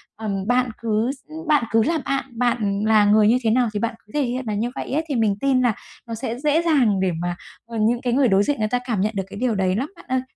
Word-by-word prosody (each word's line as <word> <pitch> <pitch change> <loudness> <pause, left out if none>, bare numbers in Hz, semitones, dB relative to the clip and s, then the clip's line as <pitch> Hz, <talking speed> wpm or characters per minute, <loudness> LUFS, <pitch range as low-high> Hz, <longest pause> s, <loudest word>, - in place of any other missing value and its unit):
ờm, 200 -3 -4
bạn 250 +1 +2
cứ 225 +2 0
s 275 - -10 0.3
bạn 295 -4 +3
cứ 225 0 +4
là 330 +5 +1
bạn, 275 0 0
bạn 215 -4 0
là 215 -1 +5
người 210 +1 +5
như 235 +3 +4
thế 225 - +2
nào 245 +2 +3
thì 205 - -1
bạn 230 +1 -2
cứ 210 - -20
thể 295 - +1
hiện 250 +1 -2
là 215 - -1
như 225 +4 -1
vậy - - -5
ấy, 310 +3 +1
thì 280 - -1
mình 220 -4 +2
tin 270 -2 +2
là 245 -3 +2 0.3
nó 230 - -4
sẽ 235 +1 -4
dễ 300 +3 +2
dàng 265 - +2
để 185 -1 +1
mà, 175 0 -2 0.3
ờ, 230 0 -7
những 235 +3 +2
cái 245 -1 -1
người 265 0 +4
đối 195 -2 +4
diện 285 +2 -1
người 215 - +1
ta 245 - +1
cảm 225 -6 -1
nhận 215 +2 0
được 195 - -1
cái 200 - -8
điều 245 -2 0
đấy 190 -1 +1
lắm 260 +8 -2
bạn - - -16
ơi. 260 0 0
230 Hz, 290 wpm, -22 LUFS, 210-255 Hz, 0.3 s, là